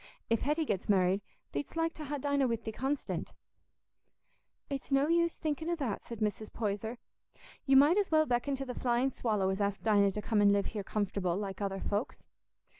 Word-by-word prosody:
If 230 - +3
Hetty 300 +3 +1
gets 200 -7 -2
married, 190 0 +3 0.3
theed'st 140 - -4
like 330 0 0
to 305 - -7
ha' 290 +1 -3
Dinah 280 -1 +1
wi' 230 - +1
thee 220 -1 -6
constant." 270 +5 -3 1.3
"It's 275 0 -5
no 275 +1 +4
use 335 0 +2
thinking 315 +1 -2
o' 345 - +1
that," 260 -11 -3
said 230 -2 -7
Mrs. 215 0 -2
Poyser. 220 +2 -3 0.7
"You 270 0 +6
might 300 +8 +6
as 400 - 0
well 310 -1 +4
beckon 250 +2 0
to 270 0 -4
the 250 - -4
flying 245 +2 +1
swallow 210 -6 0
as 190 +2 -2
ask 200 0 -1
Dinah 205 -2 +4
to 210 - -3
come 215 -2 +2
an' 200 0 +6
live 200 0 +2
here 210 -2 -3
comfortable, 195 -3 -1
like 195 -1 -4
other 195 -1 -2
folks. 205 +5 -2
235 Hz, 195 wpm, -32 LUFS, 200-285 Hz, 1.3 s, You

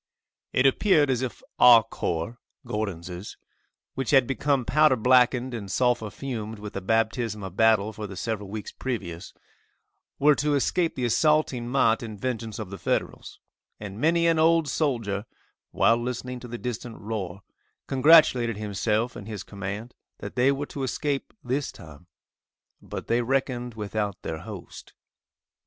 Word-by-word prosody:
It 130 - +2
appeared 145 0 +4
as 125 -1 0
if 130 -2 -5 0.2
our 120 -2 +9
corps, 105 +1 -3 0.3
(Gordon's,) 95 -5 -5 0.6
which 135 - -3
had 135 -3 +5
become 135 0 0
powder 150 -2 +4
blackened 125 +1 +3
and 105 -4 -5
sulphur 120 0 +1
fumed 110 -3 -5
with 105 0 -8
the 100 - -4
baptism 110 +1 0
of 95 -1 -7
battle 110 -1 +3
for 105 0 -6
the 100 - -9
several 105 -2 -4
weeks 105 0 -6
previous, 95 -10 -5 0.9
were 150 +2 +5
to 145 +1 +1
escape 165 +4 +1
the 125 - -1
assaulting 140 -1 +2
might 120 -4 +3
and 110 -3 -7
vengeance 115 -3 -3
of 105 -4 -6
the 100 - -7
Federals, - - -3 0.4
and 105 +1 -7
many 170 +2 +3
an 165 -1 +3
old 165 -1 +4
soldier, 115 -9 -1 0.4
while 115 - +3
listening 125 +1 -4
to 120 - -9
the 120 0 -6
distant 120 -1 -5
roar, 100 -2 -5 0.4
congratulated 130 -5 +5
himself 105 +3 -1
and 100 - -9
his 105 -4 -6
command 100 +4 -6 0.2
that - - -8
they 130 +2 +4
were 140 +1 -2
to 140 - -7
escape 140 +2 -2
this 130 +3 -2
time. 80 -1 -14 0.7
But - - -7
they 120 +1 +1
reckoned 125 -1 -1
without 105 -2 -3
their 80 -1 -4
host. - - -10
115 Hz, 150 wpm, -26 LUFS, 105-130 Hz, 0.9 s, our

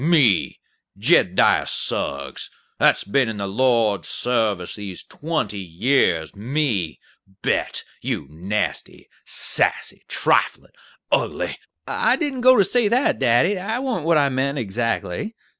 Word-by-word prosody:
"Me, 145 - +3 0.4
Jed - - +3
diah - - +3
Suggs, 70 -1 -2 0.3
that's - - +4
been 125 +4 +1
in 110 - -5
the 100 - -3
Lord's 110 -2 +1
sarvice 110 -7 -1
these 100 -4 -7
twenty 150 -11 -3
years, 90 - 0
me 110 - -2 0.4
bet, - - -1 0.2
you - - -3
nasty, 95 +6 -4 0.2
sassy, - - +1
triflin', - - 0 0.4
ugly - - 0 0.2
" 80 -1 -54
"I 245 - +2
didn't 280 -5 -2
go 255 +1 +7
to 200 - +6
say 220 +4 +2
that, 245 +6 +1
daddy; 130 - +3
that 220 +6 -3
warn't 225 - -2
what 165 -1 +4
I 140 -2 +3
meant 135 +2 -1
adzactly. 120 - -3
120 Hz, 130 wpm, -21 LUFS, -, 0.4 s, go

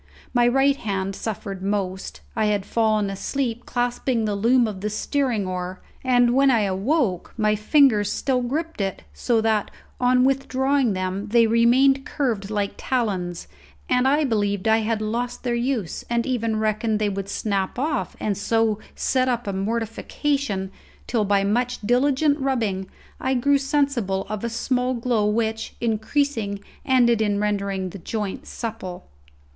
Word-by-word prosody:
My 240 -1 +4
right 270 +3 +3
hand 195 -4 -2
suffered 200 -3 -5
most; 190 -1 -3
I 220 - +1
had 205 -2 0
fallen 215 -2 +1
asleep 240 +3 -3
clasping 245 -1 0
the 210 - 0
loom 235 +4 +3
of 200 -3 -6
the 210 - -1
steering 235 -1 -1
oar, 185 0 -4 0.2
and 245 -2 +4
when 275 +1 +5
I 235 -4 +4
awoke 200 - 0
my 215 -1 +2
fingers 215 -2 +4
still 260 -2 0
gripped 305 +2 -3
it, 195 - -3
so 225 - +1
that, 220 -2 +1 0.3
on 250 0 +4
withdrawing 270 -2 +1
them, 185 +2 -3
they 230 +2 +4
remained 250 +4 +4
curved 230 -10 -2
like 205 -2 -1
talons, 190 -9 -2 0.4
and 250 +1 +3
I 290 +3 +3
believed 205 -6 0
I 220 0 +5
had 220 0 -1
lost 240 +3 -3
their 245 -2 0
use, 235 -6 -2
and 235 0 +1
even 230 -4 0
reckoned 215 0 0
they 210 0 0
would 195 0 -4
snap 200 -1 -1
off 290 +2 -1
and 205 -2 -1
so 220 +1 +1 0.2
set 255 -1 +1
up 240 -1 0
a 200 - -2
mortification, 225 +1 -2 0.3
till 225 -4 0
by 200 0 +2
much 245 +5 0
diligent 275 +6 +2
rubbing 220 -9 -1 0.3
I 260 0 0
grew 280 +3 +3
sensible 270 -9 0
of 215 0 -4
a 235 - -1
small 250 +2 0
glow 235 -3 +1
which, 220 +1 -1
increasing, 225 -2 -1 0.3
ended 240 -3 +4
in 205 -2 +1
rendering 200 -3 -1
the 200 - -8
joints 210 +1 -4
supple. 210 -6 -6
225 Hz, 155 wpm, -23 LUFS, 205-255 Hz, 0.4 s, when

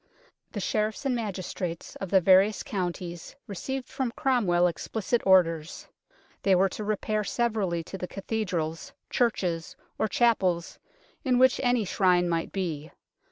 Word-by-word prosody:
The 210 - -3
sheriffs 215 +6 -1
and 265 -2 +1
magistrates 185 -5 -4
of 195 - -5
the 190 0 +5
various 190 +4 +5
counties 175 -3 -4
received 250 +5 -5
from 265 -3 -2
Cromwell 240 -12 +2
explicit 220 +6 -1
orders. 165 -4 +3 0.5
They 195 -1 +4
were 190 +2 +3
to 215 - -6
repair 215 0 -1
severally 210 -7 -1
to 190 +3 -8
the 180 - -4
cathedrals, 185 -6 -3 0.2
churches, 180 -9 0 0.2
or 220 - +2
chapels 190 -7 +1 0.4
in 255 -4 +2
which 260 +1 +5
any 245 -3 +2
shrine 180 -2 +3
might 165 -1 -1
be. 160 -5 -3
195 Hz, 135 wpm, -27 LUFS, 175-225 Hz, 0.5 s, the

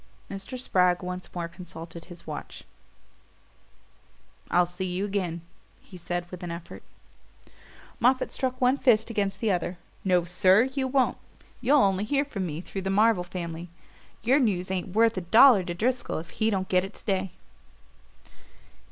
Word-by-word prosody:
Mr. 195 +6 -6
Spragg 180 -6 +2
once 180 0 -5
more 170 -1 -2
consulted 170 -1 -9
his 175 -1 -12
watch. 155 - -7 1.9
"I'll 180 0 +4
see 180 +2 -5
you 180 +2 -2
again," 185 -5 -2 0.4
he - - -16
said 175 0 -3
with 180 - -8
an 175 - -5
effort. 170 0 -8 1.2
Moffatt 255 +2 +2
struck 255 -1 -2
one 255 +2 +3
fist 230 -3 +3
against 200 -3 -1
the 220 -3 +2
other. 180 0 -2 0.3
"No, 180 -2 +3
SIR 185 +4 +4
you 265 -1 -1
won't! 260 -1 +1 0.4
You'll 275 +3 +5
only 195 0 +2
hear 280 +6 +1
from 195 -9 -4
me 155 +1 -5
through 195 +1 -6
the 190 - -3
Marvell 210 -1 +3
family. 170 -1 -6 0.5
Your 260 +6 +4
news 190 -7 0
ain't 185 0 -3
worth 225 -1 +4
a - - 0
dollar 220 +4 +7
to 175 - -4
Driscoll 240 +6 -1
if 165 +1 -7
he 220 0 0
don't 190 -3 -1
get 180 -1 +2
it 195 - -8
to - - -14
day." 190 -2 -1
190 Hz, 160 wpm, -27 LUFS, 175-225 Hz, 1.9 s, dollar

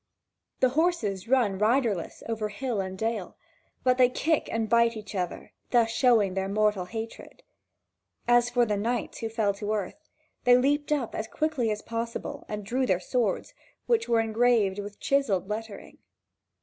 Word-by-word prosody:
The 255 - +5
horses 250 - 0
run 230 -7 +2
riderless 220 -4 0
over 220 -2 -2
hill 225 0 -2
and 190 0 -5
dale, 220 -3 -3 0.5
but 255 0 +3
they 250 -1 +6
kick 310 +4 0
and 225 -1 -1
bite 235 0 +3
each 210 -1 -9
other, 180 -3 -4 0.2
thus 235 -2 +3
showing 225 -5 +3
their 190 0 -2
mortal 210 -2 +1
hatred. 225 +4 -8 0.8
As 240 0 +4
for 245 -1 +3
the 210 -2 -1
knights 230 +3 -2
who 225 - -3
fell 220 -3 0
to 205 +1 -3
earth, 210 +8 -4 0.4
they 245 -1 +6
leaped 290 +3 +1
up 275 -6 0
as 220 - -3
quickly 305 -6 -1
as 210 -1 -3
possible 230 0 -5
and 210 -1 -5
drew 255 +5 0
their 185 -4 +2
swords, 220 +2 -1 0.3
which 460 - +1
were 230 -1 +4
engraved 225 -3 +2
with 205 0 -7
chiselled 220 -10 +1
lettering. 215 0 -6
225 Hz, 160 wpm, -27 LUFS, 205-245 Hz, 0.8 s, they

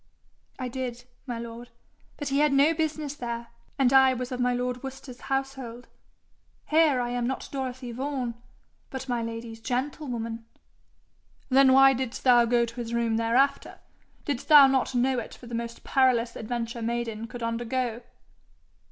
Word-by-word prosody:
'I 255 -2 -4
did, 245 -1 -5 0.2
my 240 -2 -3
lord; 235 +1 -8 0.5
but 290 - -4
he 275 +1 +1
had 300 -1 +4
no 280 +4 +4
business 310 -2 -2
there, 235 -3 -5 0.3
and 270 -2 +3
I 265 -1 +6
was 250 0 -5
of 250 - -4
my 250 0 +2
lord 250 0 -2
Worcester's 265 -2 -9
household. 270 -3 -4 0.8
Here 305 -4 +4
I 240 0 -2
am 245 -1 -1
not 265 - -3
Dorothy 260 -2 -4
Vaughan, 255 -1 -3 0.6
but 265 0 -6
my 240 -2 -1
lady's 230 0 -6
gentlewoman.' 245 -2 -3 1.1
'Then 265 0 +6
why 270 0 +7
didst 255 -1 -4
thou 245 -2 +6
go 235 0 +2
to 235 0 -10
his 235 -1 -3
room 230 -1 +1
thereafter? 235 +5 +1 0.5
Didst 280 -5 -3
thou 295 -3 +9
not 265 -1 +1
know 255 +1 +2
it - - -8
for - - -14
the 240 - -9
most 235 0 -5
perilous 245 -3 +2
adventure 235 +1 -4
maiden 230 -1 -3
could 240 +1 -8
undergo?' 235 +1 -2
245 Hz, 160 wpm, -27 LUFS, 235-270 Hz, 1.1 s, thou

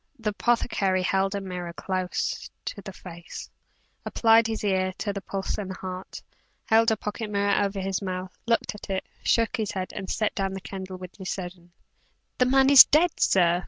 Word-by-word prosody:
The 225 -3 -2
apothecary 200 -4 +1
held 195 +1 +1
a 200 - -2
mirror 180 -2 -5
close 185 +4 -3 0.2
to 200 - -5
the 195 - -8
face; 170 -2 -10 0.5
applied 225 0 +4
his 220 -1 -3
ear 190 -2 +1
to 205 - -2
the 200 - -5
pulse 195 +1 -3
and 195 -2 -4
heart; 185 0 -7 0.4
held 225 +1 +4
a 220 - +1
pocket 210 +1 -5
mirror 200 0 +2
over 200 0 -2
his 190 +1 -2
mouth, 185 -1 -5
looked 230 -1 +1
at 210 - -11
it; 190 -1 -2 0.2
shook 230 +1 +2
his 215 -2 -2
head; 185 -1 -4
and 195 -2 -6
set 215 -1 0
down 195 -1 -2
the - - -4
candle 190 -1 -7
with 185 -1 -9
decision. 180 -2 -7 0.7
"The 250 - +4
man 270 +1 +4
is 275 - +12
dead, 320 +3 +2
sir!" 175 -2 +4
195 Hz, 185 wpm, -26 LUFS, 185-215 Hz, 0.7 s, is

